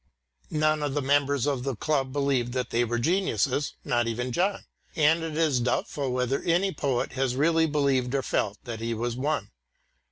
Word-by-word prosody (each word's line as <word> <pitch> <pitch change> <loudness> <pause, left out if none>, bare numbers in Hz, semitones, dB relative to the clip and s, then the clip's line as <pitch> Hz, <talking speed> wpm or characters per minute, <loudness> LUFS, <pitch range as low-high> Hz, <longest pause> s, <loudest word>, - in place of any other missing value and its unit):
None 155 0 +1
of 145 -1 -2
the 145 - +1
members 140 -1 +2
of 140 -4 0
the 135 -2 -2
club 135 +1 0
believed 135 -4 0
that 125 -1 -2
they 120 +1 +2
were 120 0 -1
geniuses, 140 - 0
not 120 -1 +1
even 125 +2 -2
John, 190 +9 0 0.3
and 160 +2 +4
it 160 -1 -4
is 155 -6 +2
doubtful 130 +2 -1
whether 125 +2 0
any 180 +3 +1
poet 135 -5 -1
has 130 -2 -1
really 160 +3 +3
believed 140 -4 +1
or 135 - 0
felt 105 -4 -1
that 115 -3 -6
he 115 0 -2
was 120 +1 -2
one. 135 -4 -2
135 Hz, 185 wpm, -27 LUFS, 125-150 Hz, 0.3 s, and